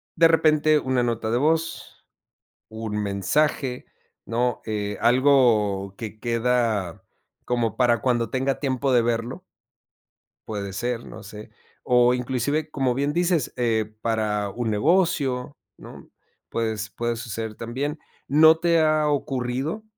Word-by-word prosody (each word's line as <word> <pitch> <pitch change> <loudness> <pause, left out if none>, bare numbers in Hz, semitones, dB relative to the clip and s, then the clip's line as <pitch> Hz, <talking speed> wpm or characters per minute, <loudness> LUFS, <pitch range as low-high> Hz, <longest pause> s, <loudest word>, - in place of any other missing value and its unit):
de 165 0 +6
repente 155 -1 +3
una 130 -2 0
nota 115 -2 -1
de 120 - +2
voz, 160 +4 -1 0.6
un 110 -1 -5
mensaje, 125 +6 0 0.4
¿no?, 120 +2 -1
eh, 105 -2 -3
algo 115 -7 +3
que 110 -2 -7
queda 115 -6 0 0.4
como 120 -3 -1
para 120 -3 +3
cuando 120 -1 0
tenga 135 +1 -1
tiempo 135 -1 0
de 120 -2 +4
verlo. 120 +8 -2 1.0
Puede 100 -2 -4
ser, 120 +3 -3
no 110 - -10
sé. 105 +1 -11 0.3
O 125 0 +4
inclusive, 135 +5 -2
como 130 -3 0
bien 140 +3 0
dices, 175 -4 0
eh, 110 -3 0
para 105 -3 0
un 115 +2 -3
negocio, 140 - +1 0.2
¿no?, - - -13 0.4
puedes 110 -2 -3
puede 120 +4 -2
suceder 115 -1 -5
también, 135 +7 -4 0.3
¿no 160 +3 +6
te 170 -1 +2
ha 155 -1 +2
ocurrido 135 - -2
125 Hz, 125 wpm, -24 LUFS, 110-145 Hz, 1.0 s, de